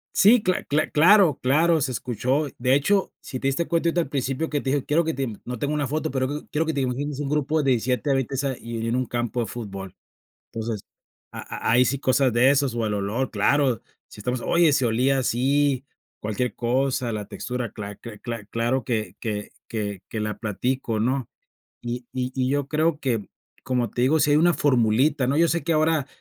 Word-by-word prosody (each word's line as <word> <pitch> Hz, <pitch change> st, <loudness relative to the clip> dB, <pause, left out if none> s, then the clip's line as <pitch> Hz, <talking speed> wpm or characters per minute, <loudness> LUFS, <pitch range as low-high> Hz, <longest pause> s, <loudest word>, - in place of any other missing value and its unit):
Sí 215 Hz, +3 st, +6 dB
cla 185 Hz, 0 st, 0 dB
cla 150 Hz, +2 st, 0 dB
claro 170 Hz, -1 st, +5 dB
claro, 155 Hz, +5 st, +3 dB
se 130 Hz, -, 0 dB
escuchó. 125 Hz, +5 st, -1 dB
De 125 Hz, +2 st, +3 dB
hecho, 190 Hz, +8 st, +2 dB
si 130 Hz, -, -6 dB
te 135 Hz, -, -1 dB
diste 135 Hz, +5 st, 0 dB
cuenta, 170 Hz, 0 st, +1 dB
ahorita 175 Hz, +1 st, +1 dB
al 160 Hz, -, -5 dB
principio 135 Hz, +3 st, -1 dB
que 145 Hz, -2 st, -1 dB
te 135 Hz, -, -2 dB
dije: 140 Hz, -1 st, 0 dB
"Quiero 165 Hz, +3 st, +2 dB
que 160 Hz, 0 st, -2 dB
te 135 Hz, 0 st, -1 dB, 0.2 s
no 125 Hz, 0 st, -5 dB
tengo 145 Hz, +6 st, -2 dB
una 145 Hz, -2 st, 0 dB
foto 155 Hz, +2 st, -2 dB
pero 130 Hz, -1 st, 0 dB
q 145 Hz, +2 st, -5 dB
quiero 160 Hz, +2 st, 0 dB
que 160 Hz, -, 0 dB
te 140 Hz, -, 0 dB
imagines 135 Hz, +3 st, -2 dB
un 145 Hz, -2 st, -2 dB
grupo 150 Hz, +1 st, 0 dB
de 135 Hz, -, +3 dB
17 125 Hz, +4 st, 0 dB
a -, -, +4 dB
20 135 Hz, 0 st, -1 dB
sa 135 Hz, -1 st, -1 dB
y 115 Hz, 0 st, -6 dB
en 115 Hz, -, -3 dB
en 120 Hz, -, 0 dB
un 130 Hz, -1 st, 0 dB
campo 120 Hz, +1 st, -2 dB
de 115 Hz, -, -1 dB
fútbol". 100 Hz, -4 st, -7 dB, 0.6 s
Entonces, 115 Hz, -2 st, -4 dB, 0.5 s
ha -, -, -5 dB
ha -, -, +4 dB
hay 125 Hz, +2 st, +6 dB
sí 135 Hz, +2 st, 0 dB
cosas 130 Hz, -1 st, +2 dB
de 120 Hz, +3 st, +5 dB
esos 140 Hz, -3 st, +2 dB
o 115 Hz, -2 st, -1 dB
el 105 Hz, -, -1 dB
olor, 105 Hz, +6 st, -1 dB
claro, 125 Hz, +3 st, +2 dB, 0.3 s
si -, -, -12 dB
estamos: 125 Hz, +4 st, -2 dB
"Oye, 170 Hz, -3 st, +4 dB
se 130 Hz, -3 st, +2 dB
olía 125 Hz, +4 st, +2 dB
así". 135 Hz, +2 st, +1 dB, 0.4 s
Cualquier 110 Hz, +2 st, -2 dB
cosa, 125 Hz, 0 st, 0 dB
la 105 Hz, -2 st, -4 dB
textura, 125 Hz, +2 st, -4 dB
cla 100 Hz, -2 st, -7 dB
cla 115 Hz, -3 st, -10 dB
cla 115 Hz, -2 st, -6 dB
claro 115 Hz, +3 st, -1 dB
que 110 Hz, -3 st, -2 dB
que 105 Hz, -2 st, -4 dB, 0.2 s
que 100 Hz, -4 st, -3 dB
que 110 Hz, -, -4 dB
la 105 Hz, 0 st, -3 dB
platico, 115 Hz, +1 st, -2 dB
¿no? 130 Hz, +2 st, 0 dB, 0.5 s
Y 120 Hz, 0 st, -5 dB
y 130 Hz, 0 st, -2 dB
y 130 Hz, -1 st, 0 dB
yo 140 Hz, -1 st, 0 dB
creo 155 Hz, 0 st, +1 dB
que, 115 Hz, -8 st, -1 dB, 0.3 s
como 125 Hz, -2 st, 0 dB
te 120 Hz, -, -2 dB
digo, 150 Hz, +5 st, +3 dB
sí 145 Hz, -, +3 dB
hay -, -, +5 dB
una 175 Hz, +3 st, +5 dB
formulita, 130 Hz, +1 st, +2 dB
¿no? 140 Hz, +3 st, +1 dB
Yo 170 Hz, 0 st, +4 dB
sé 170 Hz, -, 0 dB
que 170 Hz, -, +1 dB
ahora, 155 Hz, -2 st, +2 dB
130 Hz, 220 wpm, -24 LUFS, 120-145 Hz, 0.6 s, Sí